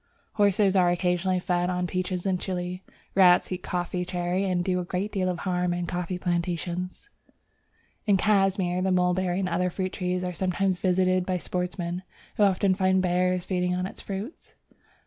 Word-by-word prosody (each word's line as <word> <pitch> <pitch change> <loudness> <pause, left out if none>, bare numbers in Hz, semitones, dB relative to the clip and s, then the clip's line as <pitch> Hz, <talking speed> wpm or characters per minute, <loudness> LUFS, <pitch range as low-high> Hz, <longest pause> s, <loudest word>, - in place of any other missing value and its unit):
Horses 200 -1 +3
are 180 -2 +5
occasionally 180 +1 +1
fed 180 0 0
on 180 0 -1
peaches 185 0 -2
in 185 -2 +1
Chile. 180 -1 -4 0.3
Rats 180 -2 +5
eat 180 0 -3
the - - -11
coffee 180 0 -1
cherry, 180 +1 -1
and 175 -1 0
do 180 -1 +1
a - - -2
great 185 +4 -3
deal 185 -2 0
of 180 - -2
harm 180 0 -1
in 175 0 -2
coffee 180 +1 -3
plantations. 175 - -3 1.0
In 200 -2 +5
Cashmir 195 -3 +2
the 190 0 +1
mulberry 180 0 +1
and 190 - 0
other 180 +1 0
fruit 185 +1 -3
trees 180 0 -2
are 180 0 -3
sometimes 185 +1 0
visited 185 0 +2
by 185 0 -1
sportsmen, 180 0 -3 0.4
who - - 0
often 195 -1 +4
find 190 0 +2
bears 180 0 +1
feeding 180 -1 0
on 180 - -1
the 190 - -6
fruits. 200 - -7
180 Hz, 175 wpm, -26 LUFS, 180-190 Hz, 1.0 s, are